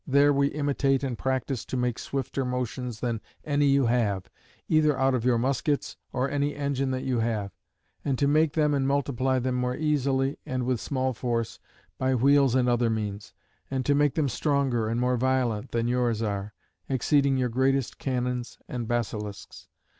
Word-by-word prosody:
There 140 Hz, +1 st, +5 dB
we 140 Hz, 0 st, +3 dB
imitate 140 Hz, -2 st, 0 dB
and 130 Hz, -3 st, -1 dB
practise 130 Hz, -1 st, -2 dB
to 130 Hz, -, -3 dB
make 125 Hz, -1 st, -1 dB
swifter 135 Hz, 0 st, -3 dB
motions 125 Hz, -2 st, -3 dB
than 115 Hz, -3 st, -1 dB, 0.2 s
any 145 Hz, -1 st, +2 dB
you 140 Hz, -1 st, +4 dB
have, 110 Hz, -6 st, 0 dB, 0.4 s
either 155 Hz, -3 st, +3 dB
out 135 Hz, 0 st, +2 dB
of 125 Hz, -3 st, 0 dB
your 125 Hz, -2 st, +4 dB
muskets 135 Hz, +4 st, 0 dB, 0.2 s
or 130 Hz, +1 st, 0 dB
any 145 Hz, +1 st, -1 dB
engine 140 Hz, -2 st, -1 dB
that 130 Hz, 0 st, -2 dB
you 125 Hz, -3 st, 0 dB
have: 110 Hz, -3 st, -1 dB, 0.5 s
and 135 Hz, -2 st, 0 dB
to 140 Hz, -, +2 dB
make 155 Hz, +1 st, +3 dB
them 150 Hz, -2 st, +2 dB
and 135 Hz, -1 st, +1 dB
multiply 135 Hz, -2 st, +1 dB
them 130 Hz, 0 st, -1 dB
more 125 Hz, 0 st, -1 dB
easily, 140 Hz, -3 st, 0 dB
and 130 Hz, -1 st, -2 dB
with 125 Hz, -3 st, 0 dB
small 130 Hz, -2 st, -1 dB
force, 115 Hz, -1 st, -2 dB, 0.4 s
by 130 Hz, 0 st, +2 dB
wheels 135 Hz, 0 st, +4 dB
and 125 Hz, -1 st, +3 dB
other 120 Hz, -1 st, +2 dB
means: 105 Hz, -1 st, -4 dB, 0.3 s
and 130 Hz, -2 st, -2 dB
to 145 Hz, -, +3 dB
make 145 Hz, -1 st, +2 dB
them 155 Hz, -3 st, +2 dB
stronger 135 Hz, -5 st, 0 dB
and 115 Hz, +1 st, -1 dB
more 125 Hz, 0 st, +1 dB
violent 125 Hz, -4 st, 0 dB
than 115 Hz, 0 st, 0 dB
yours 120 Hz, -2 st, +1 dB
are; 100 Hz, 0 st, -3 dB, 0.3 s
exceeding 140 Hz, +1 st, +2 dB
your 125 Hz, -1 st, +1 dB
greatest 130 Hz, +2 st, 0 dB
cannons 125 Hz, -2 st, -2 dB
and 120 Hz, -2 st, -4 dB
basilisks. 105 Hz, -3 st, -4 dB
130 Hz, 175 wpm, -27 LUFS, 120-140 Hz, 0.5 s, There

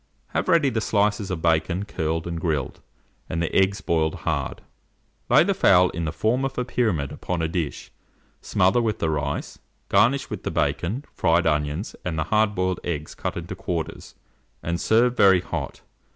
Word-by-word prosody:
Have -, -, -2 dB
ready 165 Hz, -7 st, +4 dB
the 110 Hz, -, -1 dB
slices 105 Hz, -1 st, +1 dB
of 90 Hz, -4 st, -4 dB
bacon 85 Hz, +3 st, +1 dB
curled 80 Hz, -4 st, -2 dB
and 85 Hz, -1 st, -4 dB
grilled, 75 Hz, -7 st, -2 dB, 0.5 s
and 85 Hz, -, -2 dB
the 85 Hz, -, -2 dB
eggs 95 Hz, +1 st, +3 dB
boiled 80 Hz, -1 st, 0 dB
hard. -, -, -2 dB, 0.7 s
Lay -, -, +6 dB
the -, -, +1 dB
fowl 90 Hz, 0 st, +5 dB
in 85 Hz, 0 st, -3 dB
the 75 Hz, -, -2 dB
form 115 Hz, -, 0 dB
of 135 Hz, 0 st, -3 dB
a 125 Hz, -, 0 dB
pyramid 105 Hz, -, 0 dB
upon 90 Hz, -2 st, -3 dB
a -, -, +1 dB
dish, 80 Hz, -3 st, -4 dB, 0.5 s
smother 95 Hz, +6 st, +2 dB
with 110 Hz, -3 st, 0 dB
the 80 Hz, -, 0 dB
rice, 70 Hz, -1 st, -3 dB, 0.3 s
garnish 135 Hz, +5 st, +3 dB
with -, -, -6 dB
the -, -, -3 dB
bacon, 115 Hz, +12 st, -1 dB
fried 85 Hz, +2 st, +2 dB
onions, 75 Hz, +4 st, -1 dB
and 85 Hz, -3 st, -3 dB
the 80 Hz, -, +1 dB
hard 105 Hz, -1 st, +3 dB
boiled 95 Hz, -1 st, 0 dB
eggs 80 Hz, -3 st, -4 dB
cut -, -, -4 dB
into -, -, -5 dB
quarters, 85 Hz, -3 st, -5 dB, 0.5 s
and 85 Hz, 0 st, -2 dB
serve 120 Hz, +2 st, +3 dB
very 95 Hz, -5 st, +6 dB
hot. -, -, -5 dB
90 Hz, 180 wpm, -24 LUFS, 80-110 Hz, 0.7 s, Lay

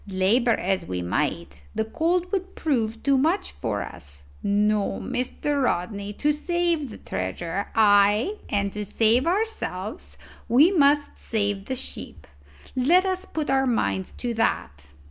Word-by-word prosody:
Labour 210 Hz, +5 st, +2 dB
as 190 Hz, +1 st, -1 dB
we 90 Hz, -1 st, -3 dB
might, 70 Hz, -5 st, -2 dB
the 220 Hz, -, 0 dB
cold 340 Hz, +9 st, 0 dB
would 385 Hz, -1 st, -3 dB
prove 230 Hz, -7 st, -1 dB
too 275 Hz, -1 st, +3 dB
much 330 Hz, +8 st, +1 dB
for 105 Hz, -4 st, -3 dB
us. 70 Hz, 0 st, -11 dB, 0.2 s
No, 205 Hz, 0 st, +1 dB
Mr. 280 Hz, +3 st, -2 dB
Rodney, 200 Hz, -1 st, -1 dB
to 295 Hz, +8 st, +1 dB
save 335 Hz, -1 st, 0 dB
the 215 Hz, -, -9 dB
treasure, 165 Hz, -, -4 dB
ay, 210 Hz, -, +4 dB
and 200 Hz, -1 st, 0 dB
to 210 Hz, -, -3 dB
save 225 Hz, -, +2 dB
ourselves, 345 Hz, -, -3 dB, 0.3 s
we 280 Hz, +10 st, +6 dB
must 290 Hz, -4 st, +3 dB
save 205 Hz, -3 st, -1 dB
the 260 Hz, -, -3 dB
ship. 95 Hz, -, -5 dB, 0.5 s
Let 335 Hz, +9 st, +4 dB
us 375 Hz, 0 st, -1 dB
put 310 Hz, -3 st, -3 dB
our 270 Hz, 0 st, +3 dB
minds 210 Hz, -6 st, 0 dB
to 240 Hz, -1 st, -3 dB
that." 225 Hz, -, 0 dB
225 Hz, 145 wpm, -25 LUFS, 200-295 Hz, 0.5 s, we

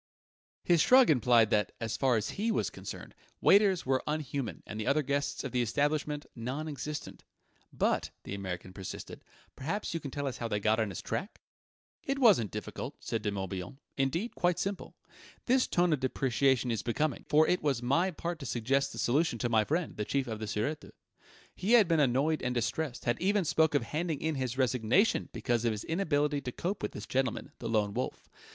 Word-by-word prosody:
His 170 Hz, -3 st, +4 dB
shrug 255 Hz, -2 st, +6 dB
implied 120 Hz, -4 st, +4 dB
that, 105 Hz, -2 st, +1 dB
as 115 Hz, -1 st, -2 dB
far 130 Hz, -4 st, +2 dB
as 105 Hz, -, -2 dB
he 215 Hz, +3 st, -1 dB
was -, -, 0 dB
concerned, -, -, -8 dB, 0.3 s
waiters 195 Hz, -3 st, +4 dB
were 130 Hz, 0 st, +1 dB
unhuman 145 Hz, -5 st, -3 dB
and 105 Hz, -, -6 dB
the 110 Hz, -, -3 dB
other 150 Hz, +2 st, +3 dB
guests 140 Hz, +1 st, -1 dB
of 135 Hz, -, -4 dB
the 125 Hz, -, +1 dB
establishment 145 Hz, +4 st, 0 dB
non 130 Hz, +6 st, -4 dB
existent. 150 Hz, 0 st, -6 dB, 0.5 s
"But," -, -, 0 dB
the -, -, -6 dB
American 95 Hz, -2 st, -5 dB
persisted, 95 Hz, 0 st, -8 dB, 0.3 s
"perhaps 165 Hz, +10 st, -3 dB
you 165 Hz, -, -1 dB
can 140 Hz, -, -6 dB
tell 145 Hz, +2 st, -4 dB
us 130 Hz, -2 st, -3 dB
how 115 Hz, -, -3 dB
they 105 Hz, -2 st, -1 dB
got 110 Hz, +2 st, +2 dB
on 110 Hz, -2 st, +1 dB
his 95 Hz, -, -6 dB
track?" 195 Hz, -, -4 dB, 0.6 s
"It 275 Hz, -3 st, -1 dB
wasn't 205 Hz, -, +5 dB
difficult," -, -, -6 dB
said 115 Hz, -, -3 dB
De 105 Hz, -, -1 dB
Morbihan: 95 Hz, +2 st, -5 dB, 0.2 s
"indeed, 165 Hz, -, -1 dB
quite 175 Hz, -1 st, +1 dB
simple. 200 Hz, 0 st, -4 dB, 0.5 s
This 255 Hz, +1 st, +3 dB
tone 175 Hz, -2 st, +2 dB
of 150 Hz, -, 0 dB
depreciation 130 Hz, -1 st, +1 dB
is 110 Hz, -4 st, -1 dB
becoming, 150 Hz, +6 st, -1 dB
for 155 Hz, +1 st, +5 dB
it 180 Hz, -, +2 dB
was 135 Hz, -5 st, 0 dB
my 165 Hz, +9 st, +2 dB
part 170 Hz, -1 st, -4 dB
to 140 Hz, -, -7 dB
suggest 135 Hz, +4 st, 0 dB
the -, -, -9 dB
solution 140 Hz, +1 st, +1 dB
to 120 Hz, +1 st, -1 dB
my 110 Hz, -2 st, +4 dB
friend, 160 Hz, +8 st, -2 dB
the 105 Hz, -, -1 dB
Chief 135 Hz, +5 st, -1 dB
of 110 Hz, -3 st, -5 dB
the 110 Hz, -, -4 dB
Sûreté. 115 Hz, +9 st, -3 dB, 0.6 s
He 200 Hz, +6 st, 0 dB
had 225 Hz, -6 st, +7 dB
been 165 Hz, -2 st, +2 dB
annoyed 145 Hz, +3 st, +2 dB
and 125 Hz, 0 st, -1 dB
distressed, 125 Hz, +3 st, -2 dB
had 120 Hz, -, 0 dB
even 200 Hz, 0 st, +2 dB
spoken 160 Hz, -1 st, +3 dB
of -, -, -10 dB
handing 160 Hz, -1 st, -2 dB
in 160 Hz, 0 st, -1 dB
his 130 Hz, -3 st, -3 dB
resignation 130 Hz, -, +2 dB
because 120 Hz, -2 st, -1 dB
of 115 Hz, -, +2 dB
his 105 Hz, -1 st, -4 dB
inability 150 Hz, -4 st, 0 dB
to 125 Hz, -2 st, -4 dB
cope 185 Hz, +10 st, -3 dB
with 105 Hz, -, -3 dB
this 105 Hz, -, -7 dB
gentleman, 130 Hz, -2 st, -1 dB
the 115 Hz, -, -4 dB
Lone 105 Hz, -2 st, +1 dB
Wolf. -, -, -4 dB
135 Hz, 200 wpm, -31 LUFS, 115-160 Hz, 0.6 s, had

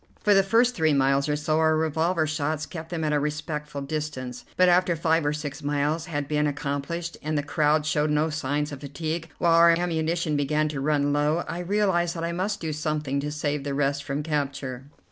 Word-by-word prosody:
For 210 Hz, -, +3 dB
the 195 Hz, -, +6 dB
first 230 Hz, +5 st, +3 dB
three 160 Hz, -7 st, +2 dB
miles 140 Hz, +1 st, +2 dB
or 150 Hz, -, +2 dB
so 155 Hz, +1 st, 0 dB
our 160 Hz, 0 st, +3 dB
revolver 160 Hz, +2 st, +1 dB
shots 155 Hz, 0 st, -2 dB
kept 160 Hz, -1 st, -8 dB
them 170 Hz, -2 st, -3 dB
at 150 Hz, -1 st, +1 dB
a 150 Hz, -, +3 dB
respectful 150 Hz, 0 st, -4 dB
distance, 140 Hz, -4 st, -5 dB
but 185 Hz, -, +5 dB
after 180 Hz, 0 st, +4 dB
five 165 Hz, 0 st, +2 dB
or -, -, +2 dB
six 150 Hz, -2 st, -5 dB
miles 145 Hz, +3 st, -1 dB
had 145 Hz, -3 st, -3 dB
been 150 Hz, 0 st, +1 dB
accomplished, 145 Hz, +4 st, -3 dB
and 155 Hz, 0 st, -2 dB
the 145 Hz, -, 0 dB
crowd 150 Hz, 0 st, +2 dB
showed 150 Hz, 0 st, +1 dB
no 150 Hz, +1 st, +1 dB
signs 150 Hz, 0 st, -1 dB
of 140 Hz, -, -7 dB
fatigue, 155 Hz, +4 st, -4 dB
while 170 Hz, -1 st, +3 dB
our 170 Hz, 0 st, +7 dB
ammunition 165 Hz, -2 st, 0 dB
began 150 Hz, +2 st, +1 dB
to 145 Hz, -3 st, -4 dB
run 145 Hz, 0 st, +1 dB
low, 150 Hz, +3 st, +1 dB
I 170 Hz, -, -4 dB
realized 180 Hz, -2 st, +1 dB
that 165 Hz, -, -4 dB
I 170 Hz, -, -1 dB
must 195 Hz, +4 st, -2 dB
do 160 Hz, -2 st, -3 dB
something 150 Hz, -2 st, -2 dB
to 145 Hz, +1 st, -3 dB
save 150 Hz, -1 st, -2 dB
the 140 Hz, -1 st, -3 dB
rest 140 Hz, 0 st, 0 dB
from 140 Hz, +2 st, -3 dB
capture. 140 Hz, -4 st, -3 dB
150 Hz, 210 wpm, -26 LUFS, 145-165 Hz, -, our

